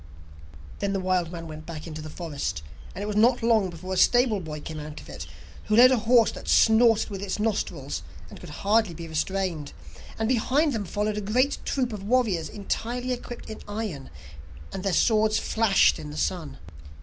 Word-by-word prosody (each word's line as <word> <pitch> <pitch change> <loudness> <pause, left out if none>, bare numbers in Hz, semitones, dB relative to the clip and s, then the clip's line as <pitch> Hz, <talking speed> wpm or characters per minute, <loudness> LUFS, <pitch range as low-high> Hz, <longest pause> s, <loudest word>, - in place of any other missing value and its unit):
Then 200 -1 -1
the 195 - 0
wild 185 -2 0
man 165 -2 -7
went 155 0 -9
back 160 -2 -7
into 155 -2 -7
the 155 - -8
forest, 150 - -4 0.3
and 200 - -4
it - - -3
was 210 0 -3
not 235 +3 +4
long 220 -5 +3
before 185 +2 -6
a - - -2
stable 240 -2 +4
boy 155 -4 -6
came 155 +1 -7
out 150 0 -8
of - - -13
it, 75 0 -7 0.4
who 215 - +1
led 250 +3 +8
a 260 - +4
horse 240 -3 +6
that - - -10
snorted 225 -1 +4
with 195 -1 -5
its 200 -1 -3
nostrils, 215 -1 -2 0.3
and - - -12
could - - -10
hardly 210 -3 +1
be 165 0 -7
restrained, 165 -1 -2 0.4
and 220 - 0
behind 265 +5 +2
them 215 -3 -2
followed 210 +3 -2
a - - -1
great 250 +8 +1
troop 250 -4 -1
of 205 - -6
warriors 205 -6 +1
entirely 240 +5 -3
equipped 245 0 -8
in 220 - -7
iron, 205 -10 -5 0.6
and - - -4
their 195 0 0
swords 215 +2 +3
flashed 220 - +3
in 75 -1 -7
the 75 - -8
sun. 75 -2 -2
200 Hz, 195 wpm, -26 LUFS, 165-225 Hz, 0.6 s, led